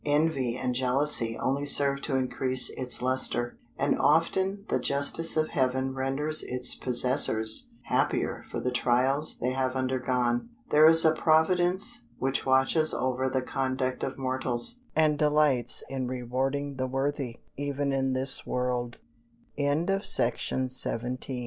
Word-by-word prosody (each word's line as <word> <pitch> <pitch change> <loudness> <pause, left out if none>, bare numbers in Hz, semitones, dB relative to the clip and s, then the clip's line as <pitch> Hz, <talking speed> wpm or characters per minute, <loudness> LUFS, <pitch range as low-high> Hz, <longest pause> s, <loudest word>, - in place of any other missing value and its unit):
Envy 145 -5 0
and 125 -1 -2
jealousy 125 -2 +2
only 135 +2 -1
serve 140 -1 +3
to 140 - -2
increase 130 0 0
its 125 -1 -4
lustre; 130 -2 +1 0.2
and - - +1
often 190 +6 +1
the - - 0
justice 140 +4 0
of 155 0 +1
Heaven 130 -2 -1
renders 135 +4 0
its 125 0 +2
possessors 120 -3 +3
happier - - -1
for - - -4
the 125 - -2
trials 130 +4 +1
they 125 - -2
have 130 0 -2
undergone. 125 - -1 0.2
There 155 +1 +7
is 165 0 +5
a 160 - +6
Providence 175 - +2
which 135 +1 -2
watches 135 +4 +2
over 130 0 -1
the 130 -1 -1
conduct 130 0 -2
of - - -4
mortals, 130 - -2 0.2
and 155 -2 +2
delights 150 -5 +1
in 130 -2 -4
rewarding 130 +3 -3
the 130 0 -2
worthy, 135 -2 -3 0.2
even 140 0 -2
in 135 -1 0
this 130 +1 +2
world. 125 -1 -2 0.6
FOOTNOTES: 165 +8 0
A 120 - +3
favourite 125 0 -3
130 Hz, 135 wpm, -27 LUFS, 125-145 Hz, 0.6 s, There